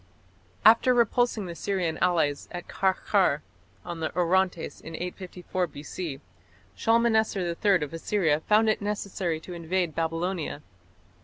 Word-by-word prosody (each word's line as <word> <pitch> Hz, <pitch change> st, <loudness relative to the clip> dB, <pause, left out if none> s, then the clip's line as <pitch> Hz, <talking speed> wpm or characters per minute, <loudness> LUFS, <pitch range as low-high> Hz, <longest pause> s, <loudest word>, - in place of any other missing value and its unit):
After 240 Hz, +3 st, +6 dB
repulsing 235 Hz, -2 st, +2 dB
the 175 Hz, -, -6 dB
Syrian 175 Hz, -3 st, -2 dB
allies 160 Hz, -5 st, +1 dB
at 175 Hz, -1 st, -7 dB
Qarqar 190 Hz, -5 st, +1 dB, 0.4 s
on 175 Hz, -1 st, -5 dB
the 160 Hz, -, -1 dB
Orontes 180 Hz, -1 st, +1 dB
in 160 Hz, -, -8 dB
854 180 Hz, 0 st, -4 dB
B.C., 150 Hz, 0 st, -6 dB, 0.5 s
Shalmaneser 225 Hz, -3 st, +2 dB, 0.2 s
III 195 Hz, -6 st, +4 dB
of 150 Hz, -, -6 dB
Assyria 165 Hz, -2 st, +1 dB
found 215 Hz, +6 st, +3 dB
it 215 Hz, -, +1 dB
necessary 200 Hz, -5 st, -2 dB
to 180 Hz, -, -9 dB
invade 170 Hz, 0 st, -1 dB
Babylonia. 165 Hz, -1 st, -2 dB
180 Hz, 125 wpm, -27 LUFS, 165-205 Hz, 0.5 s, After